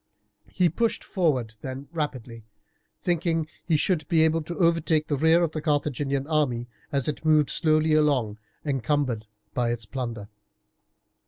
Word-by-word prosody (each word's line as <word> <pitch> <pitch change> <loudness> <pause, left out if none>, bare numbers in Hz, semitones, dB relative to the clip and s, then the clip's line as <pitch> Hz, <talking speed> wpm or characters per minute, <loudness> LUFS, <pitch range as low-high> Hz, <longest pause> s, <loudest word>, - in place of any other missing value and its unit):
He 180 +9 +2
pushed 230 +8 0
forward 135 - 0
then 130 +3 -6
rapidly, 130 -8 -4 0.6
thinking 170 -1 +1
that 155 - -15 0.2
he 165 -3 +2
should 155 -2 0
be 160 -1 +4
able 160 +1 +2
to 170 +3 -6
overtake 165 -3 +2
the 145 - 0
rear 160 +4 +4
of 165 - 0
the 155 - -4
Carthaginian 145 -2 0
army 140 -6 0 0.2
as 140 -3 +1
it 150 - -3
moved 155 -2 +4
slowly 155 -1 +3
along 135 -9 +2 0.3
encumbered 130 -4 -1 0.3
with 120 -2 +1
its 115 -2 -6
plunder. 115 -4 -5
150 Hz, 150 wpm, -26 LUFS, 130-160 Hz, 0.6 s, be